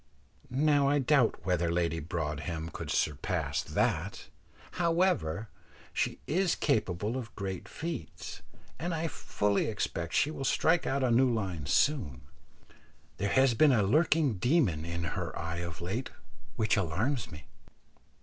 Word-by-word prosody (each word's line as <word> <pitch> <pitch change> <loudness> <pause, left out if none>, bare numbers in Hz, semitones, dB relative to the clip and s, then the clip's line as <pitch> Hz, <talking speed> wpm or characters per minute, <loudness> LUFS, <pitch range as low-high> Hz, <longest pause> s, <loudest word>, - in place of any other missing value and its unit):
Now 140 +1 +3
I 145 - +3
doubt 135 - +2
whether 90 -2 +1
Lady 85 -1 0
Broadhem 80 0 -3
could - - -7
surpass 75 -3 0
that. - - -1 0.4
However, 165 - +1 0.5
she - - 0
is 180 +1 +1
capable 105 - 0
of 120 -3 -7
great 95 -3 -4
feats, 150 - -6 0.4
and 175 +1 -2
I 165 +1 -1
fully 105 -9 0
expect 85 -6 -3
she 150 - +3
will 140 - -5
strike 160 +5 +2
out 135 0 0
a 125 - +2
new 125 +2 +4
line 95 -10 -2
soon; 90 - +1 1.0
there 100 - -1
has 130 +1 +4
been 145 +6 +5
a 110 -5 +4
lurking 150 - +3
demon 115 - +2
in 85 0 -3
her 85 - -3
eye 85 0 -3
of 85 -1 -6
late 110 +9 -3 0.5
which 110 - +2
alarms 100 - -1
me. 75 -3 -10
110 Hz, 140 wpm, -30 LUFS, 85-145 Hz, 1.0 s, been